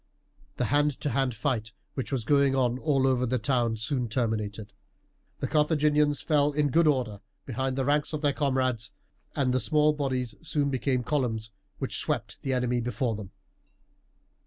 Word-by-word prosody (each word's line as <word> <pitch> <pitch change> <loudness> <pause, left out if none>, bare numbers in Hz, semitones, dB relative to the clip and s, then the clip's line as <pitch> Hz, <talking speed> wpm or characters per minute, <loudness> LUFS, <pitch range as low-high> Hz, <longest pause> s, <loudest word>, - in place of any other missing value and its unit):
The - - +1
hand 145 -2 +2
to 145 - -1
hand 130 -1 0
fight 110 -3 -2 0.2
which 130 - -4
was 125 -5 -1
going 140 0 +3
on 125 -1 +1
all 135 -3 +2
over 125 -1 +2
the 130 +2 +1
town 120 -1 +1
was 110 0 -5
soon 125 -1 -1
terminated. 110 -3 -2 0.7
The - - 0
Carthaginians 150 -1 +2
fell 150 -2 +2
in 150 - +1
in 145 - +2
good 165 +2 +4
order 120 -8 0 0.2
behind 130 +1 -2
the 135 -1 0
ranks 145 +1 +1
of 155 -2 -3
their 145 -2 +2
comrades, 130 -6 0 0.4
and 130 -2 +1
the 130 - +2
small 150 +6 +3
bodies 130 -5 -2
soon 145 -3 0
became 130 -1 0
columns 115 -6 -1 0.3
which - - -2
swept - - -3
the 135 - -2
enemy 125 -1 +1
before 120 -1 -1
them. 100 -3 -7
130 Hz, 175 wpm, -28 LUFS, 120-145 Hz, 0.7 s, good